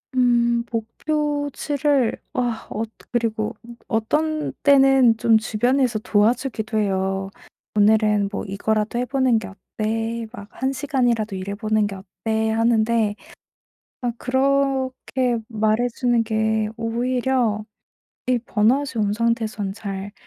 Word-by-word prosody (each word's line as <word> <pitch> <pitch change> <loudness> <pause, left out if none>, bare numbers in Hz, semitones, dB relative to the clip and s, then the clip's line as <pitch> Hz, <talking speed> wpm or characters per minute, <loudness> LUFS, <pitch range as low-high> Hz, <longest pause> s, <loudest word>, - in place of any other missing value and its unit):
음. 235 -1 +3
목표치를 290 +2 -1 0.2
아 240 -3 -2
어 220 - -1 0.3
그리고 220 -3 -1 0.3
어떤 305 +8 0
때는 270 -4 +5
좀 225 -1 +4
주변에서 240 +2 +1
도와주기도 220 +1 0
해요. 195 -1 0 0.5
"오늘은 210 -1 +3
뭐 205 - -3
이거라도 215 +3 -1
해 250 - 0
보는 260 -4 +2
게 - - -7
어때? 225 +3 -4
막 205 0 -10
1 265 +1 -2
시간이라도 245 -7 0
일해 195 +2 -4
보는 215 -1 +1
게 195 - -6
어때?" 220 +3 -2
하는데 225 -1 +2 0.9
아 245 -1 0
그렇게 260 -2 0
말해 220 +2 +1
주는 240 -1 +1
게 220 -1 0
오히려 235 -1 0 0.6
'이 250 -1 +2
번아웃이 240 +2 +1
온 200 - 0
상태에서는 220 -3 -1
잘 200 -1 -6
230 Hz, 235 characters per minute, -22 LUFS, 215-255 Hz, 0.9 s, 때는